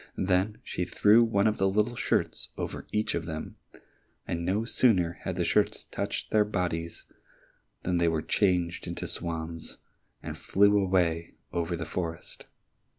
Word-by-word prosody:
Then 95 +3 +1
she 90 - -3
threw 105 +5 +5
one 100 -3 +2
of 110 -1 +2
the 95 0 +3
little 105 +5 +1
shirts - - 0
over - - -5
each 105 0 0
of 85 -1 -2
them, 80 -1 -6 0.7
and 85 0 -2
no 100 +6 0
sooner 95 -9 +3
had - - -3
the - - 0
shirts - - +2
touched - - -4
their 105 -1 +5
bodies 85 -5 -3 0.8
than 90 -1 +1
they 85 - +3
were 80 -1 0
changed 90 -4 +1
into - - -4
swans, 80 -1 -4 0.5
and - - -5
flew 100 +1 +3
away 90 -4 +1 0.2
over 85 0 -1
the 80 -1 -4
forest. 85 0 -5
90 Hz, 155 wpm, -28 LUFS, 85-105 Hz, 0.8 s, threw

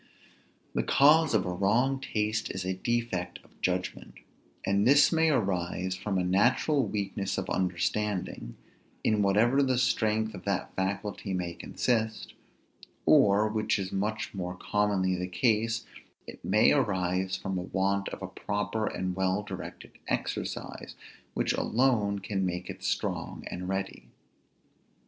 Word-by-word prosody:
The - - +1
cause 150 -1 +5
of 100 - +2
a 90 - -2
wrong 120 +9 +2
taste 110 -4 -1
is 95 -1 -4
a 95 - 0
defect 95 -4 -2
of - - -25
judgment. 90 0 -2 0.5
And 100 +3 +2
this 145 +2 +6
may 160 -1 +3
arise 95 - 0
from 95 +1 -2
a 90 - +1
natural 120 - +2
weakness 100 -1 -2
of 95 - -2
understanding 95 - -1 0.5
(in 110 -1 +2
whatever 110 +7 +4
the 130 -2 +2
strength 110 -3 +1
of 90 - -9
that 100 -2 -2
faculty 100 0 -2
may 90 -2 -2
consist), 110 +3 -1 0.7
or, 105 +1 +5
which 110 0 0
is 95 -1 -4
much 105 +3 -2
more 90 -2 -4
commonly 100 -1 +1
the 90 0 -3
case, 115 +3 +1 0.4
it - - -11
may 105 +3 +4
arise 95 -7 +1
from 95 -1 -3
a - - -2
want 100 +2 0
of - - -7
a - - -3
proper 105 +2 -2
and 90 0 -2
well 95 +2 0
directed - - -8 0.2
exercise, - - -3 0.4
which - - +1
alone 110 -5 +2
can 100 -1 -2
make 90 0 -3
it - - -12
strong - - -2
and 90 +1 -5
ready. 95 0 -3
100 Hz, 140 wpm, -29 LUFS, 95-110 Hz, 0.7 s, this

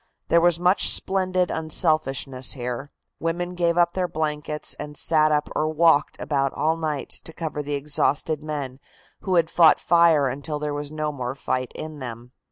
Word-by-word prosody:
There 170 - +5
was 170 -1 +3
much 180 +2 +4
splendid 185 -1 +1
unselfishness 150 -5 +1
here. 125 +2 -5 0.3
Women 175 +2 -2
gave 170 -1 0
up 175 0 +3
their 185 -1 -1
blankets 150 -1 -4
and 150 0 -6
sat 155 -1 +3
up 150 0 +1
or 155 - 0
walked 155 -2 +3
about 135 -2 0
all 160 +1 +1
night 155 -3 -3
to - - -8
cover 160 -2 -4
the 145 0 -3
exhausted 145 +1 0
men 145 -4 -5 0.4
who 190 -2 -1
had 165 -2 +3
fought 165 -3 +5
fire 170 -4 +4
until 140 +4 -3
there 150 0 -3
was 145 0 -4
no 155 -1 -2
more 130 -2 -5
fight 130 -2 -3
in 155 -1 -7
them. 120 -1 -8
155 Hz, 175 wpm, -23 LUFS, 145-165 Hz, 0.4 s, There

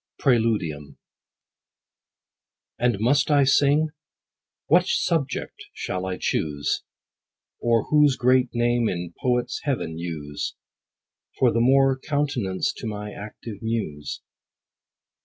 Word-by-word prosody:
X. - - -18
— - - -17
PRÆLUDIUM. 105 - +1 1.8
And 120 -4 +1
must 140 +7 +2
I 145 -2 +5
sing? 145 +3 +3 0.8
what 180 +3 +4
subject 150 -9 -1
shall 90 0 -4
I 90 -1 -3
choose? 75 -2 -1 0.8
Or 115 -2 +2
whose 150 -3 +4
great 125 0 +3
name 120 -1 +1
in 85 -1 -4
poets' 125 -1 0
heaven 85 - -2
use, 75 -4 -5 0.8
For 125 -2 +4
the 115 - +1
more 135 +1 +4
countenance 135 -11 -1
to 115 - -5
my 105 -1 -5
active 105 0 -9
muse? 100 -11 -3
120 Hz, 110 wpm, -24 LUFS, 95-135 Hz, 1.8 s, I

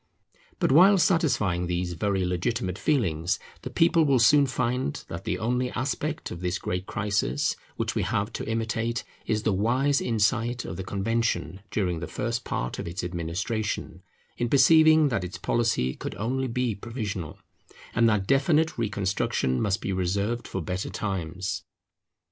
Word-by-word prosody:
But - - +1
while 185 +7 +7
satisfying 120 - +2
these 90 0 -1
very 95 +2 0
legitimate 90 +2 -1
feelings, 90 - +1 0.2
the - - -5
people 165 0 +4
will 140 -3 +3
soon 140 +5 +5
find 125 - -1
that 85 +4 -6
the - - -1
only 125 +3 0
aspect 140 +5 -3
of 85 - -6
this 90 +1 -1
great 90 +1 -3
crisis 100 - 0 0.2
which - - -2
we - - 0
have 105 +3 -1
to - - -4
imitate 115 0 -1 0.2
is 110 -1 0
the 105 - +2
wise 130 +8 +2
insight 120 +2 0
of - - -5
the 95 - -4
Convention 100 -4 -1
during 90 -5 -1
the 90 - -5
first 115 -1 -3
part - - -3
of - - -4
its 85 +2 -4
administration, 90 +6 -3 0.4
in 120 0 0
perceiving 155 +3 +6
that 115 -7 -1
its 90 0 -6
policy 110 - 0
could - - -6
only 130 +6 -1
be 125 -1 0
provisional, 100 - -5 0.6
and 115 0 +4
that 105 -3 +1
definite 145 - +2
reconstruction 95 - 0
must 100 -2 0
be 95 - -2
reserved 100 +6 -1
for - - -4
better 90 0 -3
times. 95 0 -3
110 Hz, 155 wpm, -26 LUFS, 90-125 Hz, 0.6 s, while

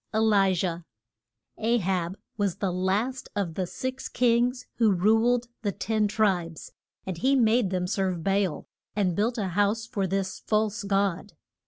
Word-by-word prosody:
ELIJAH. 190 -5 +2 0.8
A 230 +2 +2
HAB 185 -2 -1 0.2
was 200 -4 0
the 195 -2 -1
last 205 +8 -1
of 195 -5 -1
the 185 +1 -2
six 260 +6 -5
kings 245 +1 +2
who 225 -3 +4
ruled 225 +6 +3 0.2
the 205 -3 0
ten 215 +2 0
tribes. 190 -6 -1 0.3
And 185 -3 -4
he 270 +6 +3
made 230 -4 +3
them 180 -1 -1
serve 185 -3 -1
Ba 195 +2 +2
al, 155 -6 -6 0.3
and 190 -5 +1
built 225 +5 0
a 200 -4 -1
house 205 +4 +1
for 200 -5 -2
this 190 0 -2
false 215 0 0
god. 200 -1 -1
200 Hz, 155 wpm, -27 LUFS, 185-225 Hz, 0.8 s, who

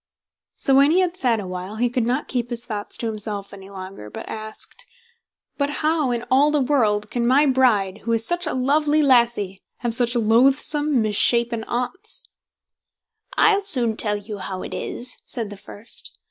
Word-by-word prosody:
So 270 - 0
when 275 +2 +6
he 355 +4 +3
had 360 -1 -1
sat 245 -10 +1
awhile, 185 +1 -6
he 240 +3 +1
could 245 -1 -1
not 255 +4 -1
keep 245 -2 -2
his 235 -1 -5
thoughts 210 -3 -4
to - - -5
himself 210 -2 -4
any 195 -1 -11
longer, 185 - -9
but - - -9
asked, 220 - -8 0.7
"But 280 0 +1 0.2
how, 310 -4 +2
in 240 -1 -2
all 275 +3 +5
the 300 0 +1
world, 220 -7 +1
can 235 -1 0
my 275 +4 +4
bride, 225 -8 +2
who 230 - -4
is 225 0 +1
such 350 -1 -1
a - - -1
lovely 295 +4 +2
lassie, 235 -7 +2 0.2
have 240 -2 -1
such 240 +1 +1
loathsome, 265 +4 +3
misshapen 230 +2 +2
Aunts?" 375 - -4 1.1
"I'll 415 -2 +5
soon 245 - +5
tell 210 -1 +1
you 205 0 -8
how 190 -1 -5
it - - -7
is", 250 +1 -2
said 230 -5 -4
the - - -7
first. 205 +3 -6
240 Hz, 175 wpm, -22 LUFS, 210-280 Hz, 1.1 s, when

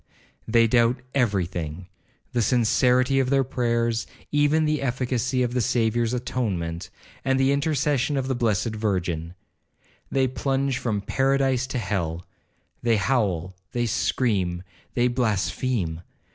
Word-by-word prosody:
They 115 0 +4
doubt 120 +2 +3
every 105 -9 +2
thing—the 90 +7 -6
sincerity 125 +3 +3
of 130 -1 +1
their 135 0 +3
prayers, 115 -2 0 0.2
even 145 +2 +3
the 150 -1 0
efficacy 125 -1 0
of 120 0 -1
the 125 - +1
Saviour's 115 0 +1
atonement, 95 -9 -2 0.3
and 135 0 +1
the 135 +1 +3
intercession 140 -1 +1
of 130 -1 -1
the 135 - 0
blessed 115 -3 +1
Virgin. 90 -5 -2 0.7
They 135 -1 +2
plunge 135 0 -1
from 105 -4 -1
paradise 135 +2 +1
to 130 - -3
hell. 90 -6 -2 0.6
They 115 -1 +3
howl, 95 -6 0 0.2
they 120 0 0
scream, 95 -6 0 0.3
they 120 0 +3
blaspheme. 110 -6 -1
120 Hz, 125 wpm, -25 LUFS, 100-130 Hz, 0.7 s, They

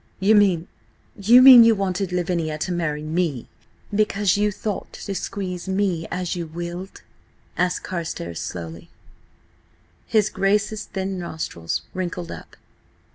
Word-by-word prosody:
"You 195 +3 +4
mean–you 205 +4 +2
mean 255 -3 +11
you 230 -1 +5
wanted 195 -1 -2
Lavinia 170 -3 -1
to 180 - -3
marry 155 -4 -2
me–because 180 - -2
you 210 +1 +1
thought 205 0 -5
to 200 - -6
squeeze 185 -2 -5
me 190 -4 0
as 180 -1 -3
you 170 -2 -4
willed?" 175 +3 -7 0.5
asked 180 0 0
Carstares 165 - -5
slowly. 85 -1 -7 1.2
His 215 -1 +2
Grace's 210 +2 0
thin 190 -1 -4
nostrils 160 - -4
wrinkled 180 -2 -4
up. - - -10
180 Hz, 120 wpm, -23 LUFS, 170-200 Hz, 1.2 s, mean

